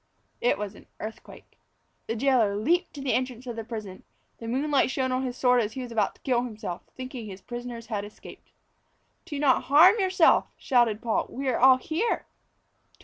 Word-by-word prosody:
It 240 - +2
was 205 0 -5
an - - -16
earthquake. 220 +1 -10 0.5
The 225 - -2
jailor 235 -5 +2
leapt 330 - +1
to 280 - -7
the 270 -2 0
entrance 255 -1 -2
of 240 -2 -5
the 225 - -5
prison. 215 -5 -7 0.4
The 230 - -7
moonlight 275 +3 +1
shone 260 -1 -1
on 255 0 0
his 255 -1 -4
sword 250 -1 +4
as 215 0 -3
he 260 - -5
was 245 - -8
about 225 -2 0
to - - -26
kill 245 -2 +1
himself, 215 -7 -6 0.2
thinking 255 -3 -7
his 190 -1 -8
prisoners 240 -1 -7
had 210 -4 -3
escaped. 205 +1 -13 0.8
"Do 305 -5 -5
not 280 -3 +2
harm 340 - +7
yourself," 370 -3 +4
shouted 240 -4 +2
Paul. 230 -2 0
"We 270 +2 -5
are 250 - 0
all 260 +1 +7
here." 330 - -2
245 Hz, 190 wpm, -26 LUFS, 225-265 Hz, 0.8 s, harm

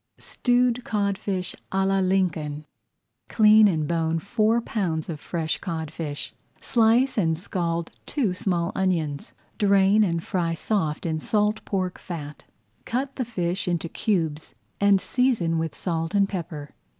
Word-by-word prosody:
STEWED 245 0 +1
CODFISH 200 -3 -2 0.2
À 190 0 +1
LA 195 0 +2
LINCOLN 165 -6 0 0.6
Clean 215 -1 +6
and 155 -6 0
bone 165 0 0
four 215 +6 +1
pounds 180 -9 -2
of 155 -3 -4
fresh 160 -1 -3
codfish. 160 -3 -5 0.3
Slice 235 +2 +3
and 160 -4 +1
scald 170 -1 -2 0.2
two 245 -11 0
small 180 -2 -1
onions, 165 -7 -1 0.3
drain 200 +1 +4
and 170 -4 0
fry 170 -4 -1
soft 165 -5 -1
in 160 -1 -1
salt 210 +5 +1
pork 185 -2 -2
fat. 150 -4 -7 0.4
Cut 270 +3 -2
the 255 - -2
fish 180 -6 -2
into 170 -1 -1
cubes 160 -6 -2 0.2
and 200 -1 +5
season 215 -10 +1
with 160 -2 -3
salt 165 0 -2
and 200 -1 +4
pepper. 165 -6 -6
185 Hz, 135 wpm, -25 LUFS, 165-210 Hz, 0.6 s, Clean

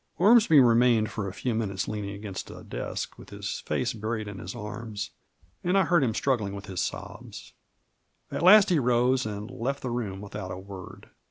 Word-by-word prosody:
Ormsby 210 -5 +6
remained 120 -3 +4
for 105 -3 -3
a - - -4
few 120 +4 -2
minutes 100 -4 -2
leaning 105 -2 -3
against 100 -2 -6
a - - -10
desk, - - -5
with - - -12
his - - -5
face - - -1
buried 110 0 -3
in 100 -2 -7
his 90 +4 -7
arms, 105 -2 -6 0.5
and 180 +2 +2
I 195 - +5
heard 170 -2 +3
him 115 -4 0
struggling 110 -8 0
with 100 0 -8
his 95 -3 -3
sobs. - - -6 0.8
At - - -3
last 195 +2 +8
he 170 - +4
rose, 125 -1 +2
and 105 +2 -6
left 140 +5 -3
the 125 - -2
room 105 -6 -3
without 100 -2 -6
a 90 - -5
word. 95 -1 -10
110 Hz, 190 wpm, -27 LUFS, 100-130 Hz, 0.8 s, last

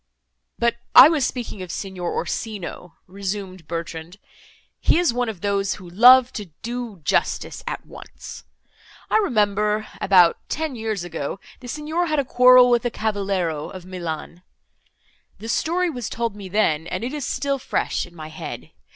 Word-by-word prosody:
"But 235 0 +1 0.2
I 265 +4 +11
was 310 -5 +1
speaking 240 -6 -6
of 185 - -7
Signor 185 -3 -4
Orsino," 180 -1 -5
resumed 190 -2 -6
Bertrand, 165 +1 -6 0.6
"he - - +3
is 345 -8 +2
one 245 -1 -1
of 200 -6 -7
those, 200 -1 0
who 185 -3 -12
love 245 +7 +7
to 210 - -5 0.2
do 235 -5 -5
justice 330 - -1
at - - -4
once. - - -11 0.7
I - - +5
remember, 210 - +1 0.2
about 180 -3 +5
ten 315 -2 -2
years 220 -5 -3
ago, 175 0 -5 0.2
the 250 - -11
Signor 310 +6 -2
had 310 -1 0
a 280 - +1
quarrel 250 0 +7
with 240 -2 +3
a 240 - 0
cavaliero 195 -8 -2
of 185 -2 -10
Milan. 175 -2 -6 1.0
The 225 - -9
story 345 +8 0
was 245 -6 -5
told 230 -2 -2
me 200 -2 -9
then, 165 -6 +1
and 185 +5 -4
it 255 +4 -3
is 295 -2 -4
still 275 +1 -1
fresh 245 - -2
in 175 - -18
my 155 -1 -8
head. 155 - -8
210 Hz, 160 wpm, -22 LUFS, 180-250 Hz, 1.0 s, I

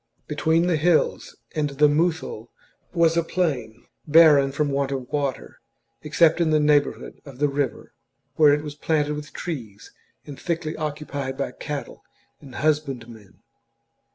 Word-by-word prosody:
Between 160 +3 +1
the 175 -3 +1
hills 165 +1 +1 0.2
and 150 -2 -1
the 145 +2 +3
Muthul 150 -7 -1 0.4
was 170 -2 +3
a 170 - +3
plain, 135 -11 -2 0.2
barren 150 -3 +6
from 145 +1 -1
want 140 0 -1
of 130 -2 -4
water, 140 -4 -3 0.4
except 160 +2 +3
in 165 - +2
the 155 -1 +3
neighbourhood 150 -1 +1
of 135 -3 -12
the 145 +2 +2
river, 140 -2 -3 0.4
where 150 -2 +6
it 150 +1 +1
was 150 -1 -6
planted 150 0 0
with 150 0 -7
trees 115 - -7 0.3
and 145 -2 -10
thickly 165 -2 -3
occupied 145 -3 -4
by 140 - -2
cattle 145 -4 -7 0.4
and 135 -4 -12
husbandmen. 125 -9 -3
150 Hz, 145 wpm, -23 LUFS, 140-155 Hz, 0.4 s, barren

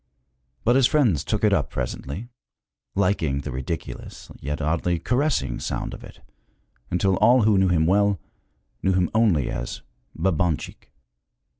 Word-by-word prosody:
But 120 - +3
his 130 -2 +5
friends 115 - +2
took 105 -1 -2
it 105 -2 +4
up - - +1
presently, 70 - -5 0.7
liking 90 -8 +1
the - - -5
ridiculous 65 +6 -6
yet 75 +2 -4
oddly 85 +3 0
caressing 120 - 0
sound - - -3
of - - -9
it, - - -13 0.7
until 95 +1 +1
all 120 +4 +5
who 105 -2 +4
knew 95 - +4
him 85 -3 +2
well 100 +1 +3 0.6
knew 95 - +2
him 90 -2 +1
only 105 - +2
as - - -5 0.3
Babanchik. 85 -2 -1
90 Hz, 140 wpm, -24 LUFS, 75-105 Hz, 0.7 s, his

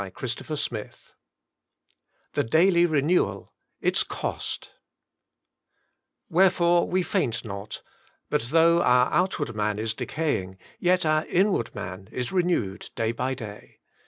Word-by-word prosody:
CHAPTER 120 +6 -5
XXVIII 115 -7 -3 1.4
THE - - +1
DAILY 170 +7 +4
RENEWAL 155 +3 +1
— - - -51
ITS - - +3
COST - - -5 0.7
" - - -51
Wherefore 175 -1 +4
we 185 0 +1
faint 120 -8 -1
not; 100 0 -7 0.4
but - - 0
though 165 +2 +5
our 125 -4 +4
outward 160 - 0
man 105 -1 0
is 110 0 -1
decaying, 95 -13 -2 0.2
yet 180 0 +2
our 155 0 +2
inward 185 - +1
man 95 +2 -7
is 125 -1 -3
renewed 175 - 0
day 115 0 0
by 125 +3 -2
day." 105 -5 -10
135 Hz, 125 wpm, -26 LUFS, 110-175 Hz, 1.4 s, though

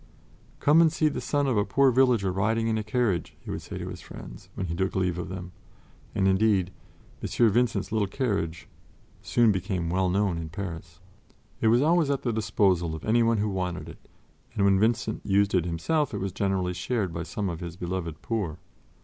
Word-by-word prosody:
"Come 150 +3 +5
and 165 -2 +5
see 155 -1 +2
the - - -4
son 145 -1 0
of 130 -5 +1
a 105 - +3
poor 135 +4 +3
villager 120 -6 +3
riding 110 +4 0
in 110 - +1
a - - -3
carriage," 105 -5 -1
he - - -8
would - - -4
say - - -7
to - - -5
his - - -8
friends - - -11
when - - -3
he 85 - -3
took 95 +3 -1
leave 90 -2 0
of 90 - -5
them; 90 -1 -6 0.6
and 95 - +2
indeed, 95 -1 +2 0.5
"M. 115 -3 +2
Vincent's 115 -3 +1
little 105 -2 +1
carriage" 100 - -2 0.5
soon 120 -2 +3
became 95 -3 -2
well 95 0 +1
known 95 -2 +1
in 80 -1 -5
Paris. 85 -2 -7 0.6
It - - +3
was 120 +4 +4
always 165 -1 +3
at 140 -1 -1
the 120 - 0
disposal 95 -6 +1
of 80 - -8
anyone 115 +1 +3
who 105 +1 0
wanted 90 -2 -3
it, - - -11 0.6
and 100 - +2
when 95 -1 +4
Vincent 110 0 0
used 100 0 +2
it 90 -3 +2
himself 130 - 0
it - - -2
was 95 0 -2
generally 95 -2 -1
shared 95 0 -2
by 85 - -3
some 100 +4 -3
of 85 -3 -4
his 85 -2 -6
beloved 85 -3 -4
poor. 100 -9 -2
100 Hz, 200 wpm, -27 LUFS, 90-115 Hz, 0.6 s, Come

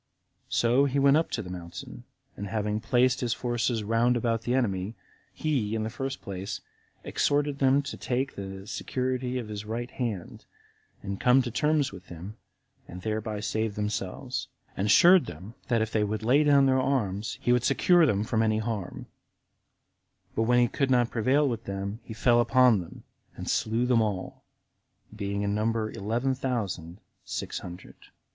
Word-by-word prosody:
So 120 +4 +3
he 140 0 0
went 140 +1 +5
up 160 - 0
to 115 - -3
the 90 - -8
mountain, 85 -2 -8 0.3
and 100 - -5
having 105 +1 -1
placed 125 +3 +2
his 120 -2 0
forces 120 -2 -1
round 115 +3 +2
about 115 -1 0
the 120 +2 0
enemy, 100 -4 -1 0.4
he, 125 -9 -1
in 110 - -1
the 110 - -3
first 135 +2 -5
place, 95 0 -5 0.4
exhorted 145 -1 0
them 135 +1 +4
to - - -6
take 130 +2 -2
the 95 0 -7
security 130 +2 -2
of 120 -3 -4
his 105 -1 -5
right 120 +3 -4
hand, 110 -9 -4 0.6
and 100 0 -4
come 125 +1 +5
to 120 - -4
terms 150 +3 +1
with 95 -1 -12
him, 90 +5 -9 0.5
and 90 +1 -9
thereby 110 -1 -2
save 110 0 -1
themselves; 105 +5 -3 0.3
and 100 - -1
assured 175 - +7
them, 95 +8 -9
that 115 -3 +2
if 110 - -5
they 110 - +1
would 105 +1 -2
lay 135 +6 +4
down 140 -2 +5
their 130 -1 +3
arms, 110 -6 -1
he 120 - +1
would 125 -1 +2
secure 165 +6 +4
them 105 -4 +1
from 110 0 0
any 110 -1 +2
harm; 110 -5 -4 1.3
but - - +1
when 120 - +5
he 120 0 +5
could 135 +3 -1
not 120 -2 +3
prevail 130 +6 +2
with 115 -3 -3
them, 100 +2 -4
he 110 - -9
fell 120 +1 +4
upon 125 -3 +5
them 85 - -11 0.3
and - - -7
slew 115 +2 +1
them 125 -2 +3
all, 100 -4 -3 0.7
being 100 -1 -2
in 100 0 0
number 110 +1 0
eleven 120 +6 -1
thousand 120 -10 -2
and 85 +2 -12 0.3
six - - -4
hundred. 90 0 -10
115 Hz, 175 wpm, -28 LUFS, 105-130 Hz, 1.3 s, assured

